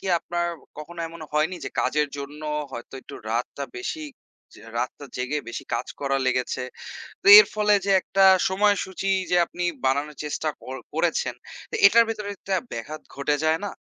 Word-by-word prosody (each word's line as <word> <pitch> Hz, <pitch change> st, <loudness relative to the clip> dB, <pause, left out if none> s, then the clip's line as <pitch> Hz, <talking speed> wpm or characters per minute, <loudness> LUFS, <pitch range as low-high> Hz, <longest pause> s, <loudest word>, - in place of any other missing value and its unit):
কি -, -, -8 dB
আপনার 175 Hz, +1 st, -2 dB, 0.3 s
কখনো 170 Hz, +3 st, -8 dB
এমন 165 Hz, 0 st, -11 dB
হয়নি? 155 Hz, +4 st, +1 dB
যে -, -, -3 dB
কাজের 150 Hz, -1 st, +1 dB
জন্য 145 Hz, +2 st, -8 dB, 0.3 s
হয়তো 120 Hz, +3 st, -8 dB
একটু -, -, -11 dB, 0.2 s
রাতটা 120 Hz, +4 st, -2 dB
বেশি 365 Hz, -4 st, -4 dB, 0.5 s
জ -, -, -15 dB, 0.2 s
রাতটা 145 Hz, -, -3 dB
জেগে 130 Hz, +4 st, -1 dB
বেশি 120 Hz, -, -6 dB
কাজ 115 Hz, -, -2 dB
করা 135 Hz, -1 st, 0 dB
লেগেছে? 125 Hz, -1 st, 0 dB, 0.6 s
তো -, -, -9 dB
এর 210 Hz, -, +8 dB
ফলে 210 Hz, -1 st, +3 dB
যে 200 Hz, -, 0 dB
একটা 195 Hz, +1 st, 0 dB, 0.3 s
সময়সূচী 195 Hz, -1 st, 0 dB, 0.2 s
যে 180 Hz, -, +3 dB
আপনি 175 Hz, -, -6 dB, 0.2 s
বানানোর 140 Hz, +3 st, 0 dB
চেষ্টা 150 Hz, +1 st, -2 dB
কর 130 Hz, -, -6 dB, 0.2 s
করেছেন, -, -, 0 dB, 0.4 s
তো -, -, -7 dB
এটার 230 Hz, +3 st, +6 dB
ভেতরে 215 Hz, -2 st, -4 dB
একটা 195 Hz, 0 st, -3 dB, 0.2 s
ব্যাঘাত 150 Hz, +7 st, -6 dB
ঘটে 145 Hz, +1 st, 0 dB
যায় 160 Hz, +1 st, +3 dB
না? 205 Hz, -, -3 dB
155 Hz, 170 wpm, -25 LUFS, 140-195 Hz, 0.6 s, এর